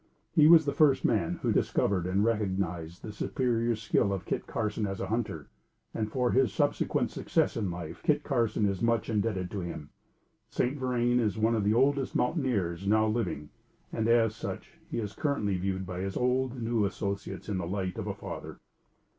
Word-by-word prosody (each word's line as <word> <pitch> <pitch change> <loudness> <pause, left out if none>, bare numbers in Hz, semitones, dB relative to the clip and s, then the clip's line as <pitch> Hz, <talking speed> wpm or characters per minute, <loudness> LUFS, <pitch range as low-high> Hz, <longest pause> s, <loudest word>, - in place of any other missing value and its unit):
He 155 -3 +6
was 160 -1 +8
the 140 - 0
first 145 -3 +4
man 105 -8 +1
who - - +2
discovered 90 -3 +1
and 95 +3 +2
recognized 95 -6 -2
the 110 - -5
superior 115 +1 0
skill 110 -2 +1
of 95 -3 -3
Kit - - -3
Carson 105 -1 -2
as 95 -1 -4
a - - -2
hunter; 105 -8 -2 0.5
and, 110 -1 -2
for 125 -2 +1
his 130 -5 +3
subsequent - - 0
success - - 0
in 105 -5 -1
life, 85 -2 -6
Kit 150 - +2
Carson 115 -6 +1
is 100 -2 -2
much 115 -1 +1
indebted 100 -4 -1
to 105 - -3
him. 85 -4 -6 0.6
St. 125 +3 0
Vrain 125 -2 +1
is 110 -2 0
one 110 +2 +2
of 110 -3 +1
the 105 +2 +2
oldest 135 +2 +2
mountaineers 100 - 0
now 110 +1 +4
living; 110 -9 -2 0.4
and, 110 0 0
as 115 -2 +3
such, - - -6 0.2
he - - -3
is 105 -3 -3
viewed 95 - -1
by 90 -1 -5
his 95 +1 -3
old 125 0 +1
and 125 -3 -6
new 115 -1 +1
associates 100 -2 -3
in 100 -3 -1
the 85 - -3
light 95 -1 -3
of - - -4
a - - -3
father. - - -7
110 Hz, 190 wpm, -29 LUFS, 95-120 Hz, 0.6 s, was